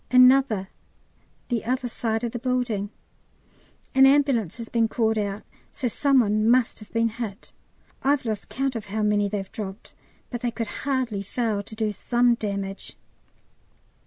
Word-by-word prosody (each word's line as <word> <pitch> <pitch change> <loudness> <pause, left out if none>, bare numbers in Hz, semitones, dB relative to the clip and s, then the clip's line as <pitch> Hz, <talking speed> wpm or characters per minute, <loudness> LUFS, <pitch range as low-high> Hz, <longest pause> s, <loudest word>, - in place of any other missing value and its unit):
Another 255 -6 +5 0.8
the 235 -3 0
other 250 +2 -1
side 225 -1 -2
of 235 - -1
the 240 - -4
building. 240 -5 -1 1.0
An 265 0 +7
ambulance 270 - +3
has 230 -1 -6
been 230 -1 +2
called 220 -1 +1
out, 205 -1 -2 0.3
so 260 - -2
some 270 +2 +3
one 215 0 +2
must 245 -1 +3
have 215 - -14
been 230 0 +2
hit; 220 -2 -7 0.5
I've 275 -1 +2
lost 215 -3 -3
count 270 -1 -1
of 225 -2 -4
how 215 +2 -2
many 205 -1 +2
they've 195 -2 -4
dropped, 200 0 -7 0.4
but 240 -2 -4
they 245 - 0
could 230 0 -5
hardly 250 -7 0
fail 210 0 -1
to 210 +2 -11
do 215 -1 0
some 240 +3 +2
damage. 200 -3 -4
230 Hz, 160 wpm, -25 LUFS, 210-250 Hz, 1.0 s, An